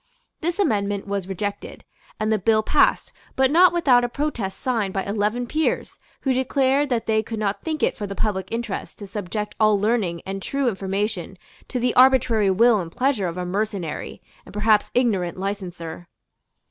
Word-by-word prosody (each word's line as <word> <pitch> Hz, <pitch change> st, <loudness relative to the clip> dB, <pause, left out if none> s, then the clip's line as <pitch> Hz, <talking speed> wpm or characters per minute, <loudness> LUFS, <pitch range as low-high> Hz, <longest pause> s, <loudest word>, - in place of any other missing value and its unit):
This 345 Hz, +1 st, -2 dB
amendment 205 Hz, -, 0 dB
was 200 Hz, -2 st, -3 dB
rejected; 200 Hz, +1 st, -5 dB, 0.4 s
and 215 Hz, 0 st, 0 dB
the 215 Hz, -, +2 dB
bill 215 Hz, +2 st, +3 dB
passed, -, -, +2 dB, 0.2 s
but 265 Hz, 0 st, +3 dB
not 355 Hz, +3 st, +6 dB
without 270 Hz, -8 st, +4 dB
a 245 Hz, -, 0 dB
protest 240 Hz, -9 st, -3 dB
signed 220 Hz, -7 st, -1 dB
by 195 Hz, -, 0 dB
eleven 210 Hz, +4 st, -1 dB
peers 310 Hz, +6 st, -1 dB, 0.2 s
who 270 Hz, -, +1 dB
declared 265 Hz, +2 st, +1 dB
that 230 Hz, -3 st, 0 dB
they 220 Hz, -1 st, +2 dB
could 225 Hz, +1 st, -6 dB
not 200 Hz, -1 st, -1 dB
think 315 Hz, -2 st, -3 dB
it -, -, +2 dB
for 205 Hz, -, -5 dB
the 200 Hz, -, -6 dB
public 190 Hz, -4 st, -1 dB
interest 230 Hz, -3 st, -4 dB
to 205 Hz, -, -8 dB
subject 210 Hz, +1 st, -4 dB
all 215 Hz, -2 st, +4 dB
learning 205 Hz, -6 st, 0 dB
and 195 Hz, 0 st, -5 dB
true 275 Hz, +5 st, -1 dB
information 195 Hz, -2 st, -2 dB, 0.3 s
to 250 Hz, -, -3 dB
the 245 Hz, 0 st, +1 dB
arbitrary 250 Hz, -5 st, +4 dB
will 220 Hz, +3 st, +4 dB
and 170 Hz, -2 st, -6 dB
pleasure 250 Hz, -8 st, +1 dB
of 170 Hz, +1 st, -5 dB
a 180 Hz, -, -3 dB
mercenary 195 Hz, -4 st, -3 dB, 0.2 s
and 185 Hz, -, -14 dB
perhaps 210 Hz, 0 st, +3 dB
ignorant 200 Hz, -9 st, +1 dB
licenser. 180 Hz, -4 st, -5 dB
215 Hz, 175 wpm, -23 LUFS, 195-245 Hz, 0.4 s, not